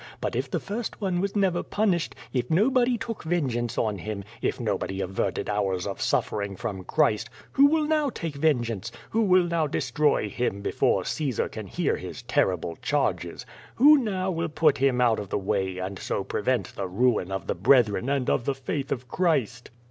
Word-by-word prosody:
But -, -, -3 dB
if -, -, -1 dB
the -, -, -1 dB
first 220 Hz, +3 st, -5 dB
one 185 Hz, -4 st, 0 dB
was 200 Hz, +1 st, -2 dB
never 190 Hz, -4 st, +2 dB
punished, 190 Hz, -6 st, 0 dB, 0.2 s
if 125 Hz, -2 st, -1 dB
nobody 240 Hz, +7 st, +3 dB
took 230 Hz, -1 st, -5 dB
vengeance 130 Hz, -9 st, -1 dB
on 105 Hz, -3 st, 0 dB
him, 105 Hz, +1 st, -5 dB, 0.2 s
if -, -, -1 dB
nobody 100 Hz, -4 st, -2 dB
averted 95 Hz, 0 st, -2 dB
hours 95 Hz, -3 st, -1 dB
of 100 Hz, -1 st, -5 dB
suffering 100 Hz, -1 st, 0 dB
from 105 Hz, -5 st, -5 dB
Christ, 145 Hz, -9 st, +1 dB, 0.2 s
who 280 Hz, +1 st, +6 dB
will 310 Hz, +1 st, +2 dB
now 305 Hz, -2 st, +2 dB
take 165 Hz, -, -5 dB
vengeance? 120 Hz, -, 0 dB, 0.2 s
Who 225 Hz, -, +2 dB, 0.3 s
now 170 Hz, -1 st, 0 dB
will 155 Hz, -, +2 dB
destroy 140 Hz, -3 st, +1 dB
him 100 Hz, -2 st, -2 dB
before -, -, +1 dB
Caesar 140 Hz, -7 st, -1 dB
can 110 Hz, -3 st, -7 dB
hear -, -, 0 dB
his -, -, -8 dB
terrible 85 Hz, -3 st, 0 dB
charges? -, -, -1 dB, 0.3 s
Who 295 Hz, +4 st, +7 dB
now 190 Hz, -6 st, -1 dB
will 165 Hz, -1 st, -2 dB
put 155 Hz, -2 st, +2 dB
him 135 Hz, -2 st, +2 dB
out 120 Hz, -3 st, +3 dB
of 100 Hz, -2 st, -6 dB
the -, -, 0 dB
way, 95 Hz, -2 st, -1 dB
and 95 Hz, +1 st, -4 dB
so 100 Hz, -, -2 dB
prevent 105 Hz, +1 st, -1 dB
the 95 Hz, -, -3 dB
ruin 105 Hz, -1 st, +1 dB
of 95 Hz, 0 st, -3 dB
the -, -, -1 dB
brethren 110 Hz, +2 st, +3 dB
and 140 Hz, -3 st, 0 dB
of 120 Hz, -, +1 dB
the 140 Hz, -, 0 dB
faith 135 Hz, +1 st, -4 dB
of 125 Hz, 0 st, -3 dB
Christ?" 125 Hz, -, 0 dB
125 Hz, 185 wpm, -26 LUFS, -, 0.3 s, Who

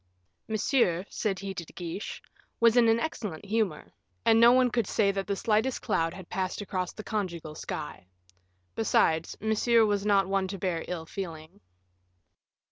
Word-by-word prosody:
"Monsieur," 215 Hz, -5 st, +1 dB
said 200 Hz, -3 st, -1 dB
he 195 Hz, 0 st, -5 dB
to 175 Hz, -, -5 dB
De -, -, -16 dB
Guiche, 175 Hz, +3 st, -6 dB, 0.4 s
"was 230 Hz, 0 st, +5 dB
in 235 Hz, -2 st, +6 dB
an 225 Hz, +1 st, +4 dB
excellent 210 Hz, -, -4 dB
humor, 210 Hz, -6 st, -1 dB, 0.3 s
and 225 Hz, 0 st, +5 dB
no 235 Hz, +2 st, +7 dB
none 255 Hz, -1 st, +4 dB
could 235 Hz, -4 st, 0 dB
say 200 Hz, -3 st, +2 dB
that 195 Hz, 0 st, -3 dB
the 200 Hz, -, 0 dB
slightest 220 Hz, +5 st, 0 dB
cloud 165 Hz, -6 st, +1 dB
had 185 Hz, 0 st, -10 dB
passed 185 Hz, -1 st, -3 dB
across 185 Hz, -3 st, -3 dB
the 215 Hz, -, -9 dB
conjugal 170 Hz, -8 st, -3 dB
sky. 150 Hz, -10 st, -6 dB, 0.7 s
Besides, 165 Hz, -7 st, +1 dB
Monsieur 220 Hz, +2 st, +3 dB
was 205 Hz, -2 st, 0 dB
not 200 Hz, -2 st, +3 dB
one 195 Hz, -1 st, 0 dB
to 195 Hz, +1 st, -5 dB
bear 180 Hz, -3 st, -2 dB
ill 170 Hz, -3 st, -4 dB
feeling." 160 Hz, -, -7 dB
195 Hz, 165 wpm, -28 LUFS, 175-220 Hz, 0.7 s, no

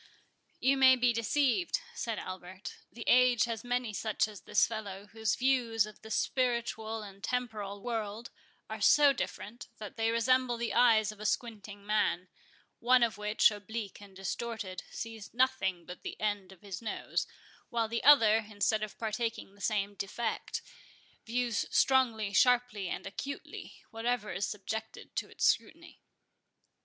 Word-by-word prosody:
"You 275 Hz, +1 st, +3 dB
may 260 Hz, -1 st, +7 dB
be 245 Hz, -1 st, +3 dB
deceived," 285 Hz, -, +1 dB
said 230 Hz, -, -3 dB
Albert; 185 Hz, +1 st, -7 dB, 0.2 s
"the 230 Hz, -, -8 dB
age 250 Hz, -2 st, +5 dB
has 230 Hz, -2 st, -3 dB
many 245 Hz, -2 st, -1 dB
such 215 Hz, +1 st, 0 dB
as 210 Hz, -2 st, -11 dB
this -, -, +3 dB
fellow, 205 Hz, -3 st, -6 dB
whose 220 Hz, +1 st, -1 dB
views 245 Hz, -4 st, +2 dB
of 215 Hz, -1 st, -13 dB
the 220 Hz, -, -11 dB
spiritual 230 Hz, -3 st, -1 dB
and 200 Hz, -1 st, -12 dB
temporal 215 Hz, -5 st, -3 dB
world 225 Hz, -1 st, -4 dB, 0.4 s
are -, -, -6 dB
so 290 Hz, -2 st, +6 dB
different, 240 Hz, -2 st, -5 dB
that 210 Hz, +1 st, -8 dB
they 225 Hz, 0 st, +1 dB
resemble 245 Hz, +1 st, +2 dB
the 235 Hz, 0 st, -2 dB
eyes 220 Hz, -3 st, +5 dB
of 215 Hz, -, -14 dB
a 215 Hz, -, -7 dB
squinting 210 Hz, -4 st, -3 dB
man; 185 Hz, -4 st, +1 dB, 0.5 s
one 250 Hz, +1 st, +5 dB
of 225 Hz, -2 st, 0 dB
which, 210 Hz, +2 st, +4 dB
oblique 210 Hz, 0 st, -6 dB
and 200 Hz, -2 st, -14 dB
distorted, 195 Hz, -1 st, -4 dB
sees 225 Hz, -1 st, -7 dB
nothing 235 Hz, -9 st, +1 dB
but 180 Hz, -, -9 dB
the -, -, -7 dB
end 205 Hz, -3 st, -2 dB
of 190 Hz, -, -16 dB
his 195 Hz, -1 st, -6 dB
nose, 220 Hz, -, -2 dB, 0.4 s
while 230 Hz, -2 st, 0 dB
the 230 Hz, +1 st, -3 dB
other, 230 Hz, -7 st, +7 dB
instead 215 Hz, +1 st, +1 dB
of 215 Hz, -1 st, -5 dB
partaking 225 Hz, -2 st, -3 dB
the 200 Hz, -, -18 dB
same 200 Hz, +1 st, 0 dB
defect, 215 Hz, +3 st, -3 dB, 0.6 s
views 240 Hz, 0 st, 0 dB
strongly, 230 Hz, -6 st, +3 dB
sharply, 240 Hz, -4 st, +3 dB
and -, -, -4 dB
acutely, 275 Hz, +8 st, -7 dB
whatever 225 Hz, -1 st, -1 dB
is 190 Hz, -1 st, -1 dB
subjected 220 Hz, +2 st, -6 dB
to -, -, -2 dB
its -, -, -1 dB
scrutiny." -, -, 0 dB
220 Hz, 150 wpm, -31 LUFS, 205-240 Hz, 0.6 s, may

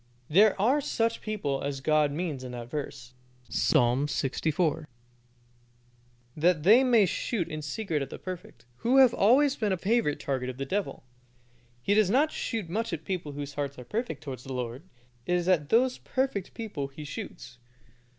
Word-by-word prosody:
There 200 Hz, +4 st, +5 dB
are 255 Hz, +9 st, +3 dB
such 230 Hz, -4 st, -1 dB
people 175 Hz, -11 st, -2 dB
as 140 Hz, -1 st, -3 dB
God 150 Hz, +1 st, +2 dB
means 150 Hz, -4 st, -3 dB
in 125 Hz, -1 st, -7 dB
that 120 Hz, 0 st, -7 dB
verse. 130 Hz, -4 st, -6 dB, 0.4 s
Psalm 130 Hz, -1 st, +2 dB
lxiv. 150 Hz, +2 st, -1 dB
4: 160 Hz, -1 st, 0 dB, 1.5 s
"That 160 Hz, 0 st, +2 dB
they 225 Hz, +9 st, +7 dB
may 235 Hz, -5 st, +5 dB
shoot 180 Hz, 0 st, -2 dB
in 155 Hz, -2 st, -5 dB
secret 155 Hz, 0 st, -2 dB
at 135 Hz, -, -4 dB
the -, -, -7 dB
perfect," 170 Hz, -10 st, -8 dB
who 245 Hz, -, +2 dB
have 260 Hz, -3 st, +7 dB
always 265 Hz, +7 st, +4 dB
been 215 Hz, -5 st, -1 dB
a 190 Hz, -, +1 dB
favorite 195 Hz, -5 st, +1 dB
target 130 Hz, -2 st, -2 dB
of 130 Hz, -, -7 dB
the 135 Hz, -, -3 dB
devil. 195 Hz, +1 st, -3 dB, 0.8 s
He 200 Hz, -, +2 dB
does 210 Hz, -2 st, +4 dB
not 285 Hz, +8 st, +3 dB
shoot 220 Hz, -7 st, -3 dB
much 220 Hz, +7 st, -2 dB
at 160 Hz, -2 st, -5 dB
people 170 Hz, -6 st, -3 dB
whose 145 Hz, 0 st, -6 dB
hearts 140 Hz, 0 st, -4 dB
are 125 Hz, -, -9 dB
perfect 160 Hz, -, -3 dB
towards 130 Hz, -4 st, -7 dB
the 135 Hz, -, -6 dB
Lord. 125 Hz, +1 st, -4 dB, 0.5 s
It 180 Hz, -, +2 dB
is 175 Hz, 0 st, -1 dB
at 160 Hz, -6 st, +2 dB
those 250 Hz, +4 st, +3 dB
perfect 260 Hz, -8 st, -2 dB
people 210 Hz, -, -4 dB
he 140 Hz, +2 st, -10 dB
shoots. 140 Hz, -4 st, -8 dB
165 Hz, 180 wpm, -28 LUFS, 140-215 Hz, 1.5 s, they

